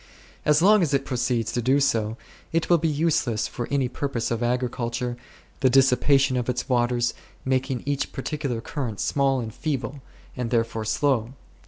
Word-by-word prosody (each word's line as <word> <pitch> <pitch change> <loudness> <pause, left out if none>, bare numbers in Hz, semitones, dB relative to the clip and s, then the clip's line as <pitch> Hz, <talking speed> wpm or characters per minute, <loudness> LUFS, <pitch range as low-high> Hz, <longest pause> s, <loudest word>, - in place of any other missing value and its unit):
As 150 +2 +4
long 210 +1 +6
as 150 -5 +2
it 135 0 0
proceeds 120 -3 -1 0.3
so, 110 -2 0 0.3
it 165 +1 0
will 170 - +6
be 165 - +1
useless 145 -7 +1
for 120 - -5
any 140 -2 +1
purpose 125 -2 -3
of 115 0 -1
agriculture, 120 0 -1 0.4
the 130 - +4
dissipation 135 +1 +4
of 125 0 -2
its 125 0 -2
waters 120 -1 +1 0.3
making 130 -1 0
each 140 -1 -1
par 135 - -6
ticular 140 -7 -3
current 120 -9 -4
small 135 -2 +1
and 110 -3 -5
feeble, 140 -2 -3 0.3
and 125 -2 -3
therefore 115 -2 0
slow. 120 +1 +1
125 Hz, 160 wpm, -25 LUFS, 120-140 Hz, 0.4 s, long